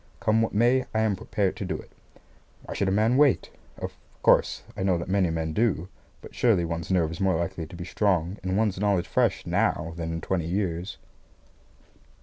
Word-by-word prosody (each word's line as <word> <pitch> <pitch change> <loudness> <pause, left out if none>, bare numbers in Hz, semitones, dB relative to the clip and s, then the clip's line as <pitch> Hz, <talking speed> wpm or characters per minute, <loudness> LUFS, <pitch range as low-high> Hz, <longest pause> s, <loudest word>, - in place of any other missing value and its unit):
Come 110 +1 +2
what 115 - -1
may, 120 +4 +4
I 110 - +3
am 110 -2 +2
prepared 95 0 -1
to - - -4
do - - -2
it. - - -13 0.7
Why - - -7
should 100 - 0
a - - +2
man 110 +5 +3
wait? 145 -2 +3 0.3
Of - - -6 0.3
course, - - +3
I - - -5
know 95 -2 +2
that 85 - -5
many 95 -2 +2
men 80 -1 -2
do; 95 -4 0 0.3
but - - -11
surely 105 -8 +3
one's 85 -1 -4
nerve 85 -4 +2
is 85 - -7
more 95 -2 +3
likely 85 -1 -3
to 85 - -11
be 90 0 -6
strong 95 -2 0
and 95 +1 -1
one's 105 -4 +1
knowledge 100 -3 +1
fresh - - +1
now 80 +1 0
than 80 -1 -3
in 80 - -3
twenty 85 0 -2
years. 90 0 -2
95 Hz, 200 wpm, -26 LUFS, 85-105 Hz, 0.7 s, may